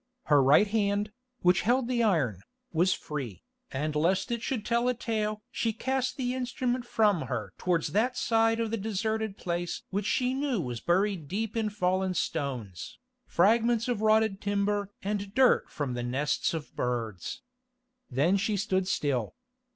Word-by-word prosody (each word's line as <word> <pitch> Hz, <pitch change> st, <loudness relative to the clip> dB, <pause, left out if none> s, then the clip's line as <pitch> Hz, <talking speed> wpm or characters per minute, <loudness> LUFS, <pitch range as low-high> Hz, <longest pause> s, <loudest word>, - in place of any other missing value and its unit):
Her 145 Hz, -2 st, +4 dB
right 140 Hz, +9 st, +6 dB
hand, 205 Hz, 0 st, 0 dB, 0.3 s
which 180 Hz, 0 st, +4 dB
held 245 Hz, +2 st, +2 dB
the 245 Hz, -1 st, +1 dB
iron, 145 Hz, -, +1 dB, 0.3 s
was 175 Hz, +3 st, +3 dB
free, 135 Hz, -, -4 dB, 0.3 s
and 150 Hz, +3 st, -2 dB
lest 185 Hz, +7 st, +1 dB
it 235 Hz, -1 st, -1 dB
should 230 Hz, -3 st, -2 dB
tell 235 Hz, +1 st, +1 dB
a 250 Hz, -, +2 dB
tale 215 Hz, -2 st, -2 dB
she 230 Hz, -2 st, -1 dB
cast 260 Hz, +2 st, -1 dB
the 250 Hz, -2 st, -1 dB
instrument 250 Hz, -1 st, -2 dB
from 210 Hz, -8 st, +2 dB
her 105 Hz, -7 st, -4 dB
towards 170 Hz, -4 st, +1 dB
that 225 Hz, -, +1 dB
side 225 Hz, 0 st, +2 dB
of 225 Hz, -1 st, -1 dB
the 230 Hz, -, 0 dB
deserted 220 Hz, 0 st, -2 dB
place 175 Hz, -1 st, -3 dB
which 200 Hz, +1 st, -1 dB
she 255 Hz, 0 st, +1 dB
knew 270 Hz, -4 st, 0 dB
was 125 Hz, -7 st, -3 dB
buried 185 Hz, -2 st, +1 dB
deep 215 Hz, +6 st, -3 dB
in 220 Hz, -2 st, 0 dB
fallen 185 Hz, -2 st, 0 dB
stones, 130 Hz, -, -3 dB, 0.3 s
fragments 230 Hz, +5 st, +3 dB
of 240 Hz, -4 st, -1 dB
rotted 220 Hz, -2 st, +3 dB
timber 205 Hz, 0 st, 0 dB
and 200 Hz, 0 st, -3 dB
dirt 260 Hz, -1 st, +4 dB
from 145 Hz, -5 st, -3 dB
the 120 Hz, -, -3 dB
nests 135 Hz, +7 st, 0 dB
of 155 Hz, -2 st, -7 dB
birds. 120 Hz, -, -3 dB, 0.7 s
Then 150 Hz, +10 st, +2 dB
she 205 Hz, +1 st, 0 dB
stood 190 Hz, -2 st, 0 dB
still. 135 Hz, -, -1 dB
200 Hz, 160 wpm, -29 LUFS, 160-225 Hz, 0.7 s, right